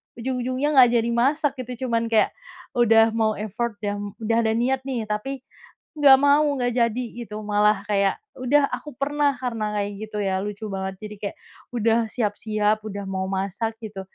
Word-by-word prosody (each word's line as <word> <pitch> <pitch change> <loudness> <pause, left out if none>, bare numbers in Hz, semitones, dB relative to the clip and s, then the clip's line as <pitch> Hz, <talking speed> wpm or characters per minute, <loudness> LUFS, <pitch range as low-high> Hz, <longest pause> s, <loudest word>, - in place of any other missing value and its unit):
ujung-ujungnya 255 +4 -1
nggak 250 -2 +9
jadi 235 0 +2
masak, 275 +4 +1
gitu. 250 0 -5
Cuman 230 0 +1
kayak, 225 -2 +3 0.5
udah 225 -1 +5
mau 220 -1 +1
effort, 220 +3 -3
ya, 205 -1 -2
udah 210 +3 -2
ada 220 - +2
niat 260 +3 0
nih, 235 -5 -3
tapi 255 +6 -3 0.6
nggak 270 -2 +9
mau, 285 +2 +5 0.2
nggak 245 -1 0
jadi, 235 0 +1 0.2
gitu, 210 0 -7
malah, 210 -1 +2
kayak 200 -2 +2 0.2
udah 280 +3 +2
aku 300 - -6
pernah 290 +1 +2
karena 230 -4 -2
kayak 205 0 -2
gitu 215 -1 -6
ya, 190 -2 0
lucu 210 +1 -5
banget. 190 -1 -4
Jadi 210 0 -8
kayak, 200 - -4 0.3
udah 230 -1 +2
siap-siap, 215 -1 0
udah 200 -2 -5
mau 190 0 -3
masak, 200 +4 -2
gitu. 210 -3 -7
225 Hz, 170 wpm, -24 LUFS, 210-255 Hz, 0.6 s, nggak